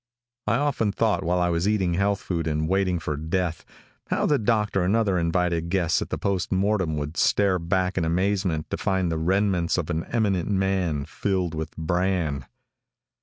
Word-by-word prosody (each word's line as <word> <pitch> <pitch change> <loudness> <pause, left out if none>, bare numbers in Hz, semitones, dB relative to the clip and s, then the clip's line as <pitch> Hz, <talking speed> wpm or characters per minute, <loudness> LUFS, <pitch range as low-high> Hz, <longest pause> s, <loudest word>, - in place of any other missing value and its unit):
I 105 - +3
often 135 -6 +1
thought 110 -1 +1
while 90 +1 +1
I 90 0 +2
was 85 +3 0
eating 95 -5 +1
health 100 +2 +1
food 85 -3 -2
and 75 0 0
waiting 95 0 +1
for 75 -2 -3
death, 80 +2 -2 0.4
how - - 0
the 145 - +2
doctor 105 -3 +1
and 90 +4 +2
other 100 -5 +2
invited 85 0 0
guests 85 -3 +1
at - - -4
the - - -2
post 95 -4 -1
mortem 95 -4 +1
would 75 +2 -4
start 95 -4 +2
back 95 0 +1
in - - 0
amazement 90 -1 0
to - - -1
find 95 -3 0
the 80 - -1
remnants 90 0 +1
of 90 -4 -2
an 80 +1 -2
eminent 100 -7 0
man 95 -7 0
filled 95 -2 -1
with 80 0 -5
bran! 85 -4 -1
90 Hz, 180 wpm, -25 LUFS, 85-100 Hz, 0.4 s, I